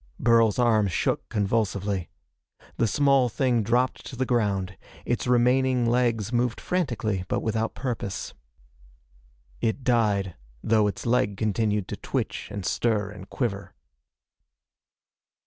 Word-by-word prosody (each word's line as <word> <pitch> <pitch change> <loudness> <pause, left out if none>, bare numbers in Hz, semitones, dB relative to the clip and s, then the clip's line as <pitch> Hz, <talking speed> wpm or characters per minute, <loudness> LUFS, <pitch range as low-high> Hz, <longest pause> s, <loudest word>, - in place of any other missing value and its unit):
Burl's 115 -2 +4
arm 115 -4 +3
shook 90 - -1
convulsively. 100 -3 -1 0.7
The 115 - +2
small 135 0 +3
thing 125 0 +1
dropped 120 +4 0
to 130 - -8
the 130 +2 -1
ground. 100 -6 0 0.3
Its 120 - -1
remaining 125 +1 +3
legs 115 -2 +1
moved 120 0 0
frantically 120 - -1
but - - -1
without 110 0 -1
purpose. 115 -8 -4 1.3
It 115 +4 -1
died, 105 -6 +1 0.3
though 110 -1 +3
its 100 - -4
leg 120 -4 +1
continued 105 -2 0
to - - -4
twitch - - -3
and 100 -3 -6
stir 105 -4 0
and 100 -2 -11
quiver. 100 -6 -3
115 Hz, 120 wpm, -26 LUFS, 100-125 Hz, 1.3 s, Burl's